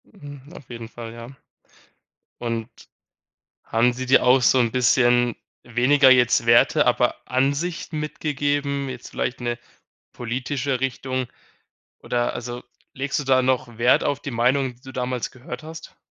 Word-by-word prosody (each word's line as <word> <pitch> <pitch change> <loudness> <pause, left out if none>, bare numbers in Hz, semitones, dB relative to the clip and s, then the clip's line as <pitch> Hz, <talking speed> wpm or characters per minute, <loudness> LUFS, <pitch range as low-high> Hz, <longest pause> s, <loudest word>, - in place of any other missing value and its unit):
Hm, 145 -8 -12
auf 140 - -13
jeden 115 -2 -7
Fall, 115 -1 -9
ja. 115 0 -9 1.1
Und 115 -1 -3 0.9
haben 120 +2 +2
sie 130 +1 -5
dir 130 +1 +4
auch 125 +1 +5
so 130 +2 +4
'n 115 -2 +2
bisschen, 120 -1 +3 0.3
weniger 130 +4 +4
jetzt 125 -2 +4
Werte, 115 0 +4
aber - - +2
Ansicht 140 +7 -1
mitgegeben, 145 -2 -2
jetzt 125 -2 -8
vielleicht 120 - -3
'ne 120 0 -2 0.6
politische 130 +2 -3
Richtung, 130 -1 -2 0.7
oder 120 0 -1
also 120 +1 -6 0.3
legst 140 +2 -2
du - - -3
da 130 -1 +4
noch 125 -2 -1
Wert 120 +2 +4
auf 140 0 -1
die 145 - -5
Meinungen, 125 +2 +1
die 120 - -28
du 130 -1 -11
damals 125 -1 -3
gehört 130 +5 -9
hast? 160 0 -10
125 Hz, 145 wpm, -23 LUFS, 120-140 Hz, 1.1 s, auch